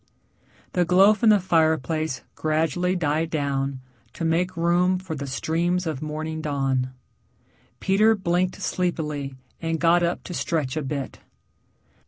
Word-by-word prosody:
The 180 - +3
glow 190 +4 +6
from 220 +1 +3
the 210 -1 +6
fireplace 160 -4 +1
gradually 160 +4 0
died 160 -1 0
down 140 -3 -2 0.3
to 165 - -4
make 175 +2 0
room 175 +2 +2
for 180 -3 -6
the 140 -1 -5
streams 170 +6 0
of 155 -5 -3
morning 155 +1 -4
dawn. 135 -3 0 0.9
Peter 215 +3 +4
blinked 180 -1 0
sleepily 150 -6 -2 0.3
and 165 -1 -1
got 170 +1 +4
up 170 0 -1
to 180 - -7
stretch 155 -6 -1
a 155 - -1
bit. 140 -1 -4
165 Hz, 135 wpm, -24 LUFS, 150-180 Hz, 0.9 s, glow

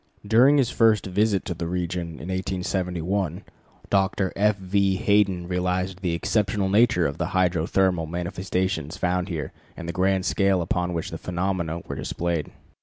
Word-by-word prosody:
During 125 +7 +5
his 130 -3 +2
first 110 -2 +3
visit 100 +1 +1
to 90 - -2
the 85 0 -4
region 90 -1 -3
in 80 +3 -8
1871, 95 -1 -2 0.5
Dr. 95 -1 +1
F. 105 +1 +2
V. 95 0 +1
Hayden 100 -4 +2
realized 90 +1 -1
the 90 -3 0
exceptional 100 +2 0
nature 110 -3 +4
of 70 +1 -2
the - - 0
hydrothermal 90 -1 +1
manifestations 90 -1 -2
found 90 +1 0
here 80 -5 -4 0.3
and 85 - -7
the 85 - -3
grand 95 +1 +1
scale 95 -4 +2
upon 90 +1 -1
which 85 -1 -3
the - - -6
phenomena 90 -2 -2
were - - -7
displayed. 85 -2 -2
90 Hz, 155 wpm, -24 LUFS, 85-100 Hz, 0.5 s, During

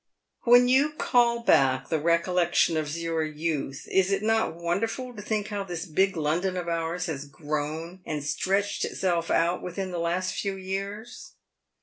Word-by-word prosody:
When 245 +1 +7
you 275 +4 +3
call 240 -5 +2
back 135 - +3
the 160 - +1
recollections 170 +1 +2
of 155 0 -2
your 165 -1 -1
youth, 155 -3 -3
is 190 0 +3
it 195 +1 0
not 220 -6 +1
wonderful 220 +9 -2
to 210 - -7
think 215 0 -2
how 205 -2 -3
this 175 -2 -5
big 190 +2 +1
London 170 +5 0
of 175 -1 -4
ours 170 +1 -1
has 145 -5 -4
grown 155 +4 -4
and 150 -4 -4
stretched 195 +6 0
itself 170 -3 -1
out 170 +2 +2
within 185 +1 -4
the 175 - -3
last 175 +2 -1
few 200 -1 -2
years 200 - -6
180 Hz, 160 wpm, -27 LUFS, 160-200 Hz, -, When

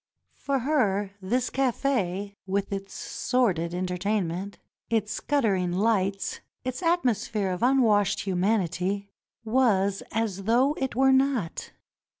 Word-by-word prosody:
For 280 -1 -1
her 215 -8 +1
this 240 +6 -1
cafe, 225 -7 0
with 200 +1 -1
its 195 0 -5
sordid 190 -10 0
entertainment, 185 +1 -2 0.3
its 215 -2 0
guttering 200 -11 +1
lights, 195 -1 0 0.2
its 255 +5 -4
atmosphere 240 - +1
of 180 - -4
unwashed 225 -6 +3
human 195 +3 +1
ity, 190 +4 -3 0.3
was 210 -5 +2
as 205 -4 -2
though 250 +6 +3
it 265 -4 -2
were 265 +1 +4
not. 265 -10 0
205 Hz, 115 wpm, -26 LUFS, 190-250 Hz, 0.3 s, were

